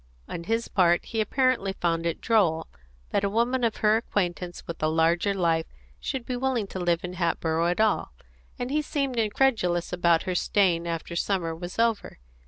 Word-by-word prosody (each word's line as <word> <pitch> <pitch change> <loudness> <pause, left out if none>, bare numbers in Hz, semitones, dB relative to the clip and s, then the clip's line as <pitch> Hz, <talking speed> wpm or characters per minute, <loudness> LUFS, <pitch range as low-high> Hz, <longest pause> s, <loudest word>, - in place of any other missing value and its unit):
On 170 - -6
his 225 +3 0
part, 175 -2 +3
he 225 -2 -1
apparently 255 -3 +1
found 170 -2 -1
it 165 - -2
droll 175 -8 +2 0.5
that 200 - +1
a 200 - +1
woman 240 +4 +1
of 230 -2 +1
her 215 +1 +5
acquaintance 180 -5 -3
with 170 - -7
a 155 - +2
larger 165 +5 +2
life 165 -3 +1 0.3
should 260 -3 -4
be 250 - -3
willing 250 -3 0
to 190 - -5
live 175 -2 +1
in 180 0 -5
Hatboro' 170 -1 0
at 175 +3 0
all, 215 - +2 0.5
and 245 +1 -4
he 305 +1 +2
seemed 275 -4 -2
incredulous 210 -7 +1
about 170 -2 +3
her 185 - -2
staying 175 -2 +2
after 170 0 -4
summer 170 -3 -1
was 175 +2 -7
over. 230 -2 0
185 Hz, 185 wpm, -26 LUFS, 170-230 Hz, 0.5 s, her